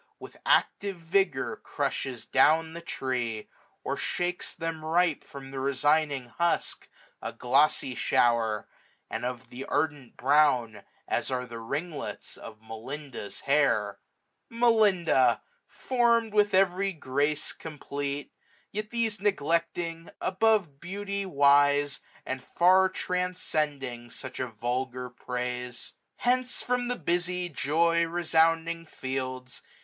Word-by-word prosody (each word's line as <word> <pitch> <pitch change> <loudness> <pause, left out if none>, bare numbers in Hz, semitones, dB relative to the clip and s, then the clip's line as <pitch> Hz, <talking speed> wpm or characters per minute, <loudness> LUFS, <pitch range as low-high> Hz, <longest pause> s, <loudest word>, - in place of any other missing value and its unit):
With - - -11
active 200 -2 +2
vigour 165 -4 +1
crushes 130 -3 -3
down 160 +4 +4
the 170 - -7
tree; 125 -8 -3 0.3
Or - - -1
shakes 180 0 -2
them 165 -1 -4
ripe 165 0 +2
from 135 -1 -10
the 135 - -4
resigning 140 -1 +1
husk, 170 0 0 0.3
A - - -4
glossy 135 +1 +2
shower, 115 -3 +2 0.4
and - - -3
of 125 0 -4
an 130 +2 -5
ardent 145 -5 -1
brown. 130 -5 +3 0.3
As - - 0
are 125 -1 -1
the 115 -2 -8
ringlets 145 +8 -4
of 110 0 -11
Melinda's 115 +1 -7
hair: 110 -9 +2 0.5
620 230 - -10
Melinda! 190 - +4 0.2
form'd 235 -3 +1
with 205 -2 +4
every 195 +1 +3
grace 145 0 -1
complete} 145 -2 -5 0.4
Yet 215 +1 -4
these 225 -4 -1
neglecting, 170 -2 0
above 190 -7 +2
beauty 200 +2 -4
wise. 145 -2 +4 0.3
And 130 -1 -4
far 185 +5 +4
transcending 150 -10 -2
such 130 +2 -8
a 130 - -1
vulgar 125 +2 -3
praise. 125 0 -4 0.2
Hence 255 0 +1
from 250 0 0
the 245 - 0
busy 180 -2 -1
joy 165 +3 +2
resounding 165 0 +2
fields. 130 -2 -4
150 Hz, 115 wpm, -28 LUFS, 130-180 Hz, 0.5 s, down